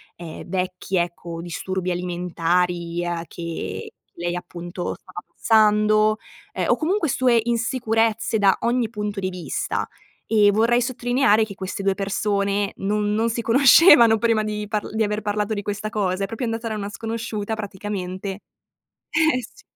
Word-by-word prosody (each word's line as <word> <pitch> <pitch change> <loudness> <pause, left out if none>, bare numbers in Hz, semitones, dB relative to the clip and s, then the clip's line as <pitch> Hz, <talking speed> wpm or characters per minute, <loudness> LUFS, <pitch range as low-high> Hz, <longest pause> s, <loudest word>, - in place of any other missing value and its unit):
ehm, 170 -2 -9
vecchi, 185 +1 -3
ecco, 170 -1 -2
disturbi 185 +1 -3
alimentari, 175 0 -1
uhm, 170 -1 -2
che 170 -1 -6 0.2
lei 175 +1 -3
appunto 175 0 -5
stava 185 -1 -10 0.2
passando, 215 0 +4 0.4
ehm, - - -1
o - - +4
comunque 330 0 0
sue 245 -2 +3
insicurezze 230 -2 0
da 195 -2 +4
ogni 235 -1 +1
punto 210 -2 -4
di 185 -1 -1
vista. 180 -1 -3 0.5
E 205 -1 +6
vorrei 230 +3 +3
sottolineare 245 -2 +2
che 200 -3 -6
queste 190 +1 -5
2 195 -1 +2
persone 200 0 0
non 210 +1 0
non 225 +2 +1
si 235 +1 -2
conoscevano 245 -1 +7
prima 225 -1 +2
di 210 0 -3
parl 210 -2 -2
di 220 - +2
aver 210 0 -1
parlato 210 +1 -1
di 205 - -2
questa 210 +1 -4
cosa. 195 -2 -1
È 195 - -1
proprio 225 +3 -4
andata 225 0 -3
da 215 - -3
una 205 -1 -4
sconosciuta 225 -1 -4
praticamente 195 -2 -5 0.8
eh 310 -5 +2
sì. 230 - -14
210 Hz, 150 wpm, -23 LUFS, 185-225 Hz, 0.8 s, conoscevano